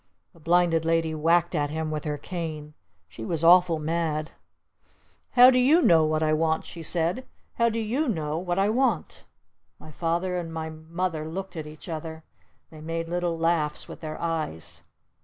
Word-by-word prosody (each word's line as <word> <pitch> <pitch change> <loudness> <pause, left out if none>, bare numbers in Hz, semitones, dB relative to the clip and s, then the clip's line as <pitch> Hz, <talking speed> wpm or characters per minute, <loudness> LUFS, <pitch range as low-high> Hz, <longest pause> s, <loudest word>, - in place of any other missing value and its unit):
The 170 - -19
Blinded 170 0 +2
Lady 165 -1 +1
whacked 170 +3 +2
at 145 -3 0
him 160 +1 -3
with 155 0 -4
her 150 -1 -2
cane. 155 -2 -6 0.3
She 110 +6 -10
was 165 +6 -1
awful 175 -1 +6
mad. 155 0 -2 1.0
"How 250 +1 +8
do 255 - +3
you 285 +7 +5
know 165 - +5
what 155 0 0
I 155 0 +2
want?" 160 0 0
she 170 - -9
said. 170 - 0 0.4
"How 235 0 +4
do 230 - -3
you 240 +7 -1
know 155 -5 -2
what 175 0 -2
I 195 +1 +3
want?" 230 -4 -1 0.5
My 155 - -13
Father 175 +3 -1
and 165 -2 -6
my 160 -1 -5
Mother 160 0 -4
looked 190 +3 -6
at 155 -2 -5
each 155 +3 -12
other. 160 -1 -6 0.5
They 155 -1 -12
made 165 +1 -4
little 175 -1 -1
laughs 165 -2 0
with - - -10
their 155 -1 -6
eyes. 85 - -4
165 Hz, 175 wpm, -26 LUFS, 155-175 Hz, 1.0 s, How